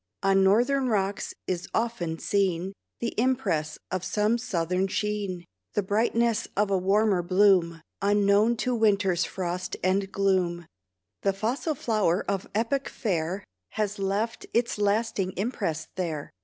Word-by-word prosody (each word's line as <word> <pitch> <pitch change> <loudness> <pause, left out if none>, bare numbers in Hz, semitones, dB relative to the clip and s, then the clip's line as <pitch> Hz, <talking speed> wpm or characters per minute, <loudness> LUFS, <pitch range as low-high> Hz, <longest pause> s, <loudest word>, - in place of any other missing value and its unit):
On 195 0 +4
northern 245 +7 +3
rocks 200 -2 -1
is 180 -1 -3
often 225 -9 -1
seen 190 -1 0 0.3
The 235 - -1
impress 200 -12 0
of 185 -1 -2
some 210 +5 +1
southern 180 -3 0
sheen, 200 -3 -2 0.3
The 205 - +2
brightness 225 +3 +1
of 205 0 +2
a 195 - +3
warmer 195 0 +3
bloom, 180 -3 +3 0.2
Unknown 205 +3 +3
to 250 - +1
winter's 200 -6 +2
frost 180 -1 -4
and 195 +1 +1
gloom. 185 -4 +1 0.6
The 195 - +2
fossil 250 +9 -1
flower 210 -8 +1
of 195 -1 -2
epoch 260 +5 0
fair 185 -3 -2 0.3
Has 210 -1 -2
left 200 +4 -2
its 235 -2 +1
lasting 205 -2 0
impress 195 -7 -2
there. 160 -6 -3
200 Hz, 130 wpm, -27 LUFS, 185-220 Hz, 0.6 s, On